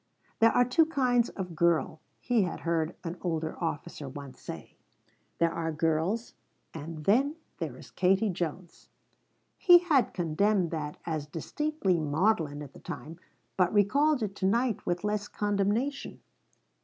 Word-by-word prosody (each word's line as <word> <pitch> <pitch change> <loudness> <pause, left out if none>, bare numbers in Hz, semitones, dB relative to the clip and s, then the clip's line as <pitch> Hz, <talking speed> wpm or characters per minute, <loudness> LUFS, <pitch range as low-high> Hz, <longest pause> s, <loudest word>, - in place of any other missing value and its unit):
"There 225 0 +6
are 245 - +4
two 310 +6 +3
kinds 250 -6 +2
of 180 -4 -6
girl," 170 -1 +2 0.2
he 240 -3 +2
had 180 -4 -2
heard 165 -1 -1
an 170 0 -5
older 160 -3 -2
officer 155 -3 -4
once 140 0 -10
say. - - -8 0.6
"There 165 0 +2
are 165 -1 -2
girls, 165 +8 0 0.4
and 155 0 -7
then 270 +9 +3 0.2
there 150 -7 -4
is - - -13
Katie 195 +3 +2
Jones." 175 0 -5 0.7
He 355 -4 +8
had 315 -9 +2
condemned 180 +2 +1
that 150 -2 -4
as 155 -3 -3
distinctly 190 - -1
maudlin 155 -1 +1
at 140 - -11
the - - -13
time, 165 +2 -8 0.4
but 180 -2 +3
recalled 255 +7 +3
it 200 -2 -3
to 190 - +1
night 235 +1 0
with 175 +1 -1
less 210 0 -1
condemnation. 210 +7 -1
180 Hz, 145 wpm, -29 LUFS, 160-225 Hz, 0.7 s, He